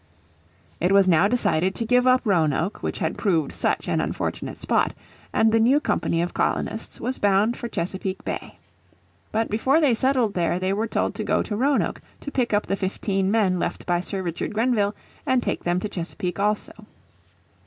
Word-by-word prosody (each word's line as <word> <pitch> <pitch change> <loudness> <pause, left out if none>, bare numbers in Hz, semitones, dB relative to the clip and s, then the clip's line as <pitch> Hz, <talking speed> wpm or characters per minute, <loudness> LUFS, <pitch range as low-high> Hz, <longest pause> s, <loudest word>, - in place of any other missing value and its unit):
It 180 +3 +1
was 195 -1 +5
now 175 +2 +5
decided 190 -6 +2
to 230 - -2
give 250 +2 +3
up 255 0 +5
Roanoke 170 -1 +1
which - - -3
had 160 -4 -2
proved 165 -8 +1
such - - -1
an - - +1
unfortunate - - -3
spot, - - +1 0.4
and 220 0 +3
the 225 - +3
new 250 +6 +4
company 170 - 0
of 175 - -4
colonists 220 - -2
was 255 +3 -3
bound 205 +3 +3
for 240 - -5
Chesapeake 190 -1 -4
Bay. - - -5 0.7
But 225 0 -1
before 260 +8 +3
they 290 -6 +4
settled 250 -3 +2
there 175 -1 0
they 185 +1 0
were 215 +3 -1
told - - -1
to - - -4
go - - +1
to 210 - -4
Roanoke 275 +5 +1 0.2
to 285 - -6
pick 250 -4 0
up 205 0 +1
the 195 - -1
fifteen 195 0 -1
men 200 -4 +2
left - - -3
by 175 -1 +1
Sir 190 +1 -3
Richard 170 +4 -4
Grenville 220 -3 +1 0.3
and 255 -2 +2
take - - -2
them 175 +1 +1
to 210 - -2
Chesapeake 180 -1 -4
also. 210 +1 -2
205 Hz, 185 wpm, -24 LUFS, 185-230 Hz, 0.7 s, was